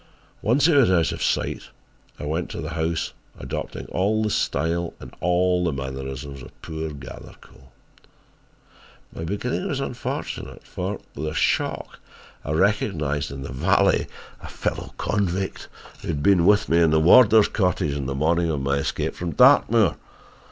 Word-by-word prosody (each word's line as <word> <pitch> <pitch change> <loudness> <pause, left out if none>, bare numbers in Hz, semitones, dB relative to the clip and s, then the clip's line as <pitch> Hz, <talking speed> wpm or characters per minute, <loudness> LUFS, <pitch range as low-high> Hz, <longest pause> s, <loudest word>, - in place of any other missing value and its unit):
"Once 130 +7 +3
he 165 - +5
was 135 -8 +5
out 85 -3 +3
of - - -6
sight - - -1 0.5
I - - -5
went 80 +4 -2
to - - -6
the 80 0 -5
house 80 0 -2 0.2
adopting - - -5
all 105 +4 +1
the 105 - 0
style 85 +2 -1
and - - -11
all 90 0 +2
the 85 - +1
mannerisms 65 0 -6
of - - -14
poor 80 0 -4
Gathercole. 65 -1 -12 1.5
My 80 - -5
beginning 120 - -2
was 140 -6 -2
unfortunate 130 -3 -5
for, - - -4
with 80 - -4
a 75 - -3
shock, - - -1 0.4
I - - -7
recognised 75 -6 0
in 70 -1 -7
the 65 - -7
valet 65 - +2 0.3
a - - -9
fellow - - -4
convict 95 -2 -2 0.3
who - - -8
had 75 -3 -2
been 95 -3 +4
with 105 0 +4
me 85 +1 +3
in 85 - +5
the 80 0 +3
warder's 110 +5 +7
cottage 90 -7 0
on 70 -2 -3
the 70 - -3
morning 85 +4 +1
of 75 -3 -1
my 70 +1 0
escape 70 - -2
from 85 -2 -4
Dartmoor. 120 -6 +5
85 Hz, 160 wpm, -23 LUFS, 75-100 Hz, 1.5 s, warder's